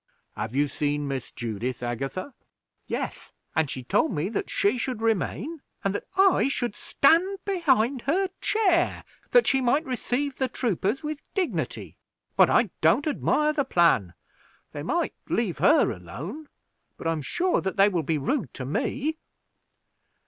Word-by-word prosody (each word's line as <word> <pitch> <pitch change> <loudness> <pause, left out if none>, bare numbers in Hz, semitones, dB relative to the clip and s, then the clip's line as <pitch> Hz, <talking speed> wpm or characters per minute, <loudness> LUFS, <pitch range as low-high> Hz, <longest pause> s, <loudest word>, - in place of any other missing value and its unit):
"Have 110 +4 -4
you 145 +1 +3
seen 145 +1 -1
Miss 135 -2 -4
Judith, 120 +2 -4
Agatha?" 135 - -4 0.5
"Yes; - - -4 0.2
and 160 -3 +2
she 130 - -5
told 275 - +2
me 170 0 -1
that 225 - -3
she 210 +5 +1
should 250 -2 -2
remain, 225 - -1 0.2
and 195 - +1
that - - -4
I 385 -7 +5
should 245 -5 -1
stand 345 +7 +3
behind 275 - +2
her 380 +5 +2
chair 370 -5 +2 0.3
that - - +5
she 270 -1 +2
might 275 +6 +2
receive 260 +2 -2
the 260 - +1
troopers 235 - -1
with 300 -1 -4
dignity; 375 -4 -2 0.4
but - - +6
I - - +3
don't 290 - +4
admire 300 0 +1
the 295 -2 +1
plan. 170 - +3 0.6
They - - -6
might - - -1 0.2
leave - - 0
her - - +5
alone, 160 - -8 0.5
but - - -10
I 165 - +2
am 160 -2 -2
sure 350 - 0
that 190 +1 -3
they 195 +1 +7
will 180 -5 0
be 155 +1 0
rude 150 - -1
to 130 - -5
me." 275 - -2
235 Hz, 155 wpm, -26 LUFS, -, 0.6 s, they